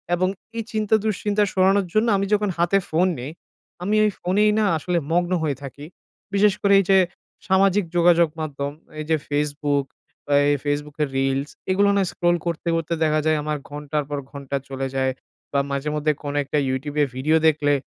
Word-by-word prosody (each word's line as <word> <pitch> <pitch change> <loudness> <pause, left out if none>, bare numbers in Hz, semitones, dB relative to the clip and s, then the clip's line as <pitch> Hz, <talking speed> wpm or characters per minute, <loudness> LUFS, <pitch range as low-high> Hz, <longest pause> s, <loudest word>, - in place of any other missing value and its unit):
এবং 185 +1 +1 0.3
এই 230 - -1
চিন্তা 215 0 +2
দুশ্চিন্তা 210 0 +1
সরানোর 190 +1 +3
জন্য 215 +2 +3
আমি 195 - 0
যখন 210 -1 +2
হাতে 175 +3 +3
ফোন 170 +4 +2
নিই 130 +5 -6 0.5
,আমি 210 +3 +1
ওই 210 - +3
ফোনেই 205 +4 +2
না 215 - +3
আসলে 175 +3 -1
মগ্ন 175 +1 +1
হয়ে 145 -4 -1
থাকি। 140 +1 -8 0.5
বিশেষ 200 0 +4
করে 200 0 +4
এই 195 - +1
যে 195 - +6 0.5
সামাজিক 195 +1 +3
যোগাযোগ 170 -1 +5
মাধ্যম 140 -2 -3 0.3
এই - - -3
যে 160 - +4
Facebook 145 -1 0 0.4
বা 145 - -1 0.2
এই 145 - +3
Facebook 145 0 -2
এর 140 - -2
reels 135 +2 0 0.2
এগুলো 200 +2 +3
না 200 - +3
scroll 175 0 +1
করতে, 170 0 -3
করতে 165 0 -2
দেখা 155 0 +2
যায় 155 -1 +3
আমার 150 0 -2
ঘন্টার 150 +1 -3
পর 145 - -2
ঘন্টা 140 -1 -5
চলে 135 0 -3
যায়। 130 0 +1 0.4
বা 140 - +2
মাঝেমধ্যে 150 +2 0
কোনো 145 0 -3
একটা 140 - -2
YouTube 140 +3 -3
এ - - +3
video 150 +5 +1
দেখলে 145 -2 +2
155 Hz, 185 wpm, -23 LUFS, 145-190 Hz, 0.5 s, যে